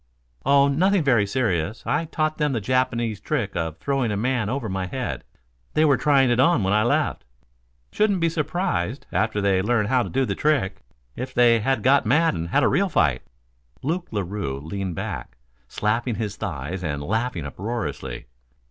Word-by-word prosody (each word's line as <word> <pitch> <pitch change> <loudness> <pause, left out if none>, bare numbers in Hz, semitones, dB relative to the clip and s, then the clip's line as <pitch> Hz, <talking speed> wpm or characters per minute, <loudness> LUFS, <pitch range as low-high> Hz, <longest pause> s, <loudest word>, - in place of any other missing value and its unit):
"Oh, 140 0 +5
nothing 180 +6 +2
very 120 -8 +3
serious. 100 -5 -1
I 150 +7 0
taught 155 -1 -2
them 150 -2 +1
the 115 - 0
Japanese 120 -1 0
trick 105 -3 -2
of 80 -2 -2
throwing 135 +2 -1
a 105 - -1
man 115 -1 0
over 125 -2 -2
my 95 -2 -3
head. 130 +5 -4 0.5
They 155 - +4
were 140 -3 +5
trying 135 -3 +3
it 120 - +2
on 140 - +4
when 95 +1 +1
I 105 - +4
left. 140 - 0 0.7
Shouldn't 205 -3 +2
be 165 - +2
surprised, 150 - -2
after 110 -1 0
they 95 -2 +2
learn 105 +1 +1
how 125 +4 +2
to - - -3
do 135 0 +1
the - - -2
trick, 100 -11 0 0.3
if 130 +1 -6
they 120 -1 +5 0.2
got 135 -2 +4
mad 160 +8 +3
and 85 -1 -3
had - - +2
a - - +5
real 195 +1 +2
fight." 75 - +2 0.6
Luke 170 +6 -2
Larue 100 -9 -3
leaned 90 +4 -4
back, - - -5 0.3
slapping 115 - -1
his 105 -3 -3
thighs 90 +8 -5
and 75 -3 -3
laughing 110 -2 -2
uproariously. 70 - -5
115 Hz, 175 wpm, -23 LUFS, 95-140 Hz, 0.7 s, Oh